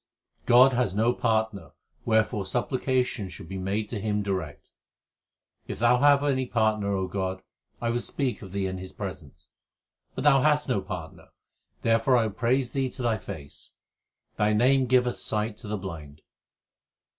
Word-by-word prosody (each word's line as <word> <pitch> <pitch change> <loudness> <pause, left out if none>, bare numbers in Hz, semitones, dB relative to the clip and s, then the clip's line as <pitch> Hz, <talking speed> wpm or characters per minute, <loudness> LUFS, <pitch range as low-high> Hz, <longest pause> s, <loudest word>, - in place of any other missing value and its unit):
God 130 +2 +7
has 120 -6 0
no 115 +3 +3
partner, 110 -8 -1 0.3
wherefore 110 -3 +1
supplication 125 -2 -1
should 85 -2 -10
be 95 +2 -5
made 100 +3 -2
to 110 -4 -4
Him 105 0 -1
direct: 95 -7 -4 1.0
If - - -5
Thou 120 +2 +4
have 145 0 +5
any 130 -3 0
partner, 105 -4 +1
God, 95 0 -3 0.4
I 115 -1 -1
will 120 - 0
speak 130 +1 -3
of 95 -4 -10
Thee 100 0 -2
in 95 0 -3
his 95 0 -8
presence. 90 -8 -8 0.7
But - - -3
Thou 140 -2 +5
hast 150 0 +2
no 125 -7 0
partner, 90 -4 -8 0.6
therefore 115 +3 +3
will 120 - +4
I - - 0
praise 120 +4 0
Thee 135 -1 -1
to 125 - -7
Thy 115 -2 +1
face. 70 -2 -9 0.6
Thy 105 +1 +2
name 130 +4 +3
giveth 125 0 +2
sight 105 0 -2
to 115 - -9
the 105 +1 -2
blind. 80 -6 -8
110 Hz, 160 wpm, -27 LUFS, 95-125 Hz, 1.0 s, God